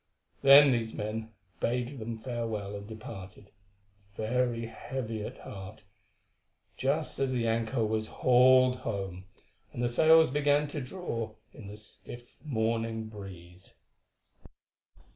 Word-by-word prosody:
Then 140 +1 +9
these 115 -2 -1
men 110 +1 -4 0.3
bade 125 +3 -1
them 115 +1 -5
farewell 110 -4 -4
and 100 0 -7
departed, 105 -3 -10 0.6
very 115 +1 0
heavy 115 -2 -5
at - - -7
heart, 100 +2 -9 0.9
just 145 +4 -1
as 135 -1 +1
the 120 -2 0
anchor 115 +1 0
was 110 0 -1
hauled 130 +1 +5
home, 95 -6 -4 0.5
and 120 - -4
the - - +3
sails 160 +4 +5
began 145 +1 +2
to 145 0 -4
draw 120 - -4 0.2
in 105 - -11
the 105 +1 -9
stiff 120 +3 -9
morning 115 -4 -1
breeze. 95 -3 -11
115 Hz, 120 wpm, -30 LUFS, 110-130 Hz, 0.9 s, Then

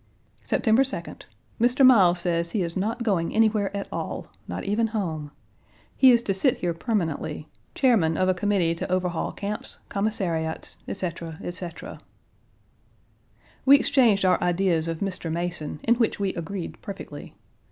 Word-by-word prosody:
September 225 +2 +2
2d. 270 0 -4 0.4
Mr. 250 +3 +5
Miles 190 -9 +6
says 170 -1 0
he 190 +2 -1
is 170 -1 -4
not 225 +5 -1
going 190 -7 0
anywhere 215 -2 +3
at 200 - -4
all, - - -5 0.2
not - - -5
even 215 +3 +1
home. 165 -9 -3 0.7
He 265 - +7
is 235 -1 +5
to 195 - 0
sit 240 +7 +2
here 175 -1 -1
permanently 165 - -2 0.3
chairman 210 - +3
of 185 - +2
a 185 - +4
committee 185 -3 +1
to 170 - -5
overhaul 180 -2 -1
camps, 205 +1 -5
commissariats, 185 -6 -2
etc., 170 -4 -5
etc. 175 -1 -6 1.6
We 280 +1 +8
exchanged 240 -9 +3
our 180 -1 +3
ideas 175 -2 +1
of 165 -1 -4
Mr. 185 -4 -3
Mason, 170 -3 -3
in 235 - +4
which 235 -3 0
we 195 -2 0
agreed 170 +1 -6
perfectly. 200 - -8
190 Hz, 145 wpm, -25 LUFS, 170-220 Hz, 1.6 s, We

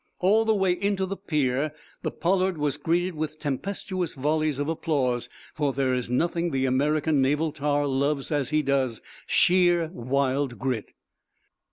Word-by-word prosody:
All 210 +5 +3
the 220 -1 +3
way 190 -2 +2
into 195 +1 0
the 195 +1 -4
pier 150 -6 -1 0.3
the - - -1
"Pollard" 185 0 0
was 150 -2 0
greeted 175 +2 0
with 155 0 -4
tempestuous 180 +5 -3
volleys 150 +1 0
of 145 +1 -2
applause, 140 -7 -1 0.2
for 145 -3 0
there 130 -1 +1
is 125 -2 -2
nothing 170 +6 0
the 135 -3 0
American 145 +3 +2
naval 150 +4 +1
tar 145 -1 0
loves 140 +1 0
as 145 -4 0
he 155 0 +1
does 135 -5 0 0.2
sheer, 175 -2 +4
wild 135 0 0
grit. 125 -5 -3
150 Hz, 155 wpm, -26 LUFS, 135-175 Hz, 0.3 s, sheer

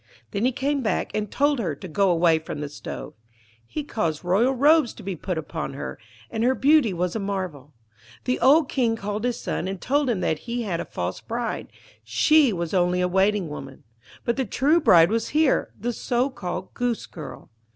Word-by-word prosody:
Then 205 +2 0
he 255 - +3
came 280 +2 -1
back, 220 - -1
and 210 -1 -2
told 285 -1 +2
her 170 -10 -1
to 185 - -9
go 190 +4 +2
away 165 -2 +4
from 155 -2 -6
the 145 -1 -4
stove. 145 - -7 0.5
He 305 - -4
caused 170 - -2
royal 205 +9 +3
robes 290 0 +4
to - - -11
be 190 -1 -3
put 180 +2 -4
upon 160 - -4
her, - - -6 0.3
and 225 -1 -1
her 255 +2 +3
beauty 275 -1 +4
was 180 +1 -2
a - - 0
marvel. 185 - -4 0.5
The 125 +3 0
old 285 +3 +5
King 240 -5 +1
called 210 0 -4
his 245 -1 -1
son, 185 - -3
and 190 -1 -4
told 280 +4 +1
him 225 -6 0
that 155 - 0
he 240 0 -1
had 180 -6 -2
a - - -3
false 90 +1 -4
bride 235 +1 -3 0.4
she 305 -5 +4
was 170 -3 -3
only 180 -1 +2
a 180 - +2
Waiting 190 +1 +2
woman; 135 -3 -9 0.4
but 235 - 0
the 265 - +1
true 285 - +3
bride 170 - +6
was 230 0 0
here, 310 -3 +3
the 240 +4 -2
so 245 +4 0
called 185 -5 -5
Goosegirl. 235 -9 -4
210 Hz, 200 wpm, -24 LUFS, 175-250 Hz, 0.5 s, bride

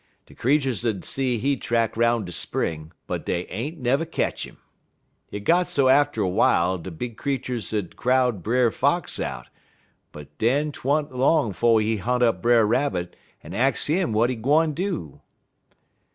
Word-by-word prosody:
De - - -17
creeturs 130 -3 0
'ud 105 -7 -2
see 130 -3 -1
he 140 +5 0
track 115 -2 -1
'roun' 115 -2 +2
de 90 - -8
spring, 80 -1 -3
but - - -4
dey 90 0 -2
ain't 140 - -5
nev' 140 +5 0
ketch - - -2
'im. - - -17 0.7
Hit 105 - -7
got 175 +5 +3
so 135 -2 +2
atter 140 -5 +3
w'ile 90 0 +2
dat - - -11
de 95 - -7
big 110 +7 -7
creeturs 125 -6 -3
'ud 105 -5 -3
crowd 125 -4 +1
Brer 120 +4 +2
Fox - - 0
out, - - -5 0.7
en 75 -1 -8
den 140 +7 +1
't - - -12
wa'n't 145 +2 0
long 135 -3 +2
'fo' 115 +3 +3
he 110 +1 +1
hunt 125 +5 0
up 115 -2 +2
Brer 120 -2 +4
Rabbit 100 -7 -1 0.3
en 80 - -9
ax 125 +3 +1
'im 180 -4 +1
w'at 115 +4 +2
he - - -3
gwine 150 +7 +2
do. 155 - -4
120 Hz, 175 wpm, -24 LUFS, 105-140 Hz, 0.7 s, Brer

